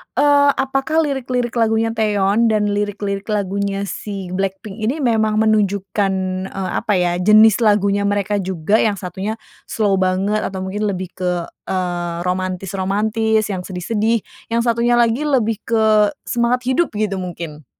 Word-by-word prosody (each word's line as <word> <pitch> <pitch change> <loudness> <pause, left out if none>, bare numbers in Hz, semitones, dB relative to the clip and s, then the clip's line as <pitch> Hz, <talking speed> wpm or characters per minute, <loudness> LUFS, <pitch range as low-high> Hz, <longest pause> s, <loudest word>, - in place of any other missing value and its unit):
eee, 285 -1 +4
apakah 270 +4 0
lirik-lirik 250 -4 -2
lagunya 225 -1 +1
Taeyeon 215 0 +2
dan 210 -2 +1
lirik-lirik 205 -1 -2
lagunya 200 -1 -1
si 195 -2 -6
BLACKPINK 195 +2 -4
ini 265 - 0
memang 220 -3 +2
menunjukkan, 205 -2 +1 0.3
eee, 190 -1 -4
apa 210 - -1
ya 180 -1 +2
jenis 215 +3 +6
lagunya 200 -1 +2
mereka 205 0 0
juga? 190 +2 0
Yang 205 -3 0
satunya 190 +5 -3 0.3
slow 200 -3 +1
banget, 190 +3 +1
atau 190 -2 -4
mungkin 205 +3 -2
lebih 185 -2 -4
ke, 180 -2 -2 0.2
eee, 175 -2 -2
romantis-romantis 195 +4 0
yang 185 -2 -3
sedih-sedih, 215 +4 -1 0.3
yang 235 0 +1
satunya 235 0 +2
lagi 240 +5 +2
lebih 225 -6 +1
ke 225 -1 0 0.4
semangat 245 +1 0
hidup 260 +6 +1
gitu 205 -2 -1
mungkin? 165 -5 -7
205 Hz, 140 wpm, -19 LUFS, 190-225 Hz, 0.4 s, jenis